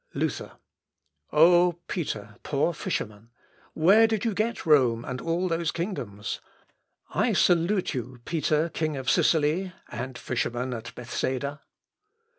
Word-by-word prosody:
Luther. - - -2 0.8
"O, 175 +3 +6
Peter, 110 - -4
poor 150 +4 0
fisherman! 110 -6 -4 0.5
where 200 +8 +6
did 220 -1 -1
you 225 - +1
get 220 +4 -1
Rome 125 -7 +4
and 125 0 -4
all 170 +3 0
those 165 -1 0
kingdoms? 125 - -4 0.7
I - - +1
salute 180 +2 +2
you, 125 -1 -5
Peter, 155 0 +1
king 155 -3 -2
of 130 - 0
Sicily!... 165 +4 +2 0.2
and 130 -1 -5
fisherman 120 +1 -2
at 115 0 -7
Bethsaida!" 130 +4 -3
155 Hz, 120 wpm, -27 LUFS, 125-175 Hz, 0.8 s, O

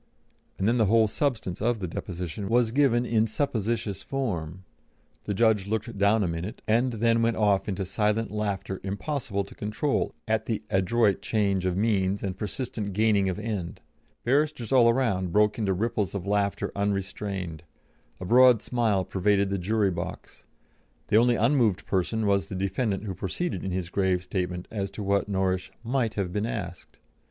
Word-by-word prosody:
and 95 - 0
then 120 +2 +2
the 110 - +4
whole 110 +1 +4
substance 110 -7 -2
of 120 +1 +1
the 95 -4 -4
deposition 90 +3 -5
was 120 -1 +3
given 125 -2 +3
in 115 -1 +2
supposititious 115 -4 -2
form. 95 - -3 0.6
The 100 - -2
judge 105 -2 +3
looked 110 +2 -2
down 100 +2 +3
a - - 0
minute, 85 +5 -5
and 120 +3 +2
then 115 +1 +2
went 115 0 +1
off 105 -2 +2
into 95 -1 -2
silent 105 +3 0
laughter 100 -2 -3
impossible 100 +1 -2
to 100 - -13
control 105 +7 -1
at 110 0 0
the 110 -3 -2
adroit 100 +2 +2
change 100 -4 0
of 90 0 -1
means 100 -2 +1
and 95 -2 -2
persistent 105 0 -4
gaining 105 -2 +3
of 90 - -3
end; 105 -6 -4 0.4
barristers 140 -2 +1
all 120 -3 +6
round 105 -8 0
broke 105 +3 +3
into 100 -3 +1
ripples 105 -1 -1
of 95 -2 -4
laughter 100 0 0
unrestrained; 100 -4 -3 0.6
a 95 - -6
broad 125 +2 +6
smile 110 -6 +1
pervaded 100 +1 +1
the 100 - -1
jury 100 +2 +1
box; 85 -1 -7 0.6
the 105 - +5
only 120 +1 +4
unmoved 115 -5 +2
person 105 +4 0
was 100 -1 +2
the 95 - -6
defendant 100 +2 -1
who 100 -3 -4
proceeded 95 - -3
in 95 - -2
his 90 -1 -3
grave 95 -2 +1
statement 90 -2 -3
as 100 -3 -2
to 100 +2 -7
what 100 +1 +1
Norrish 95 -1 0
"might" 120 -2 0
have 95 -4 -2
been 105 +2 -1
asked. 90 -7 -6
105 Hz, 170 wpm, -27 LUFS, 95-115 Hz, 0.6 s, all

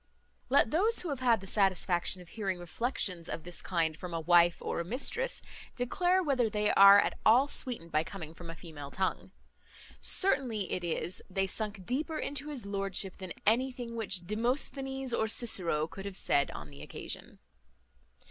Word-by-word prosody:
Let 255 -3 +4
those 420 +9 +3
who 355 - -5
have 280 -3 -3
had 235 -5 +3
the - - -9
satisfaction 185 -2 +1
of 175 - -19
hearing 195 -2 -3
reflections 180 -2 -2
of 160 - -5
this 175 0 -3
kind 165 -4 0
from 175 +1 -7
a - - -1
wife 175 +1 +4
or - - -3
a - - -1
mistress, 275 - 0 0.3
declare 355 +9 +1
whether 260 -7 +1
they 210 0 +1
are 200 0 +9
at - - +1
all 245 +6 +5
sweetened 235 - -3
by 155 +1 +2
coming 165 -2 -8
from 170 0 -11
a 165 - -6
female 155 -5 -9
tongue. 190 +2 -2 0.7
Certain 275 -10 +3
it 195 -4 -3
is, 175 +1 -3
they 195 +1 0
sunk 200 -1 -4
deeper 310 - -2
into 290 0 -4
his 270 -8 -4
lordship 195 -1 -2
than 185 -3 -7
anything 245 +1 0
which 195 -5 -2
Demosthenes 265 +4 -1
or 220 - +1
Cicero 185 -9 +2
could 195 +4 -9
have 200 -1 -4
said 140 - +3
on 75 -1 -9
the 70 0 -12
occasion. - - -7
200 Hz, 175 wpm, -31 LUFS, 175-250 Hz, 0.7 s, are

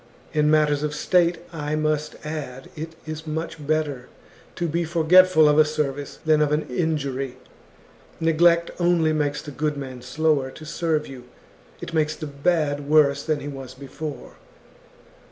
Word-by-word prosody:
In 150 0 +3
matters 150 -2 +3
of 150 0 -2
state, 175 +1 +2 0.2
I 150 -1 -2
must 155 0 -1
add, 140 -4 -6
it 160 +1 -7
is 155 0 -7
much 155 -1 -5
better 150 -5 -1 0.5
to 170 - -1
be 170 +2 0
forgetful 170 0 +5
of 150 +1 +4
a - - +9
service 145 -2 -3
than 155 -1 +4
of 150 -1 +2
an 150 +1 +1
injury. 135 -4 -2 0.8
Neglect 170 +1 +3
only 170 -3 +3
makes 145 -2 -1
the 145 - -8
good 150 +2 -2
man 130 -3 -7
slower 140 +1 0
to 155 - -11
serve 155 -1 -1
you, 130 -2 -10 0.6
it 170 - -7
makes 155 -1 +1
the 155 - -6
bad 145 -1 -1
worse 145 -2 +4
than 155 -2 -1
he 145 - -6
was 135 -3 -8
before. 140 +2 -8
150 Hz, 155 wpm, -23 LUFS, 145-160 Hz, 0.8 s, a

